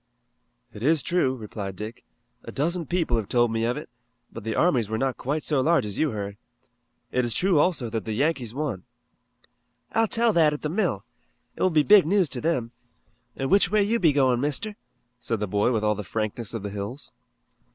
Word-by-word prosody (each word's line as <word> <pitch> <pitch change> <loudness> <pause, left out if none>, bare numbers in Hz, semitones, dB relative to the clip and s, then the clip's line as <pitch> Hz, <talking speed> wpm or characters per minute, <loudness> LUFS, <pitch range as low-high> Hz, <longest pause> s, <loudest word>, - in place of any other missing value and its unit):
"It 105 - -10
is 150 +2 +3
true," 155 -7 +1
replied 105 -4 -6
Dick. 110 +4 -8 0.4
"A - - -8
dozen 165 +3 -1
people 165 -9 0
have 110 -3 -3
told 120 -2 +2
me 115 0 0
of 120 +1 -1
it, - - -7 0.5
but - - -8
the 110 0 -3
armies 125 - +2
were 110 - -1
not 130 +1 0
quite 145 +4 -3
so 145 -4 +2
large 165 -2 +3
as 100 -2 -5
you 155 - +2
heard. 100 -3 -5 0.7
It 125 - +1
is 120 -1 0
true 185 -4 +3
also 150 -7 +2
that 110 -3 -3
the 110 - -3
Yankees 135 -2 0
won." 130 -7 -3 1.1
"I'll 225 0 +2
tell 230 +1 +2
that 155 -4 +4
at 150 - -6
the 150 - -1
mill. 200 +8 -1 0.5
It - - -9
will 185 - +4
be 155 -3 +3
big 200 -1 +6
news 190 -3 +2
to 125 - -3
them. 130 -8 -1 0.6
An' 135 0 -3
which 200 - +5
way 210 0 +3 0.2
be 175 - +4
you - - +1
goin', 130 -3 +3
Mister?" 200 +10 0 0.4
said 115 -2 -2
the 105 - -1
boy 105 +4 +1
with 110 -3 0
all 105 0 +3
the 105 - -5
frankness 110 +2 -3
of 110 - -4
the 100 - -4
hills. 105 +7 -6
130 Hz, 210 wpm, -25 LUFS, 110-165 Hz, 1.1 s, big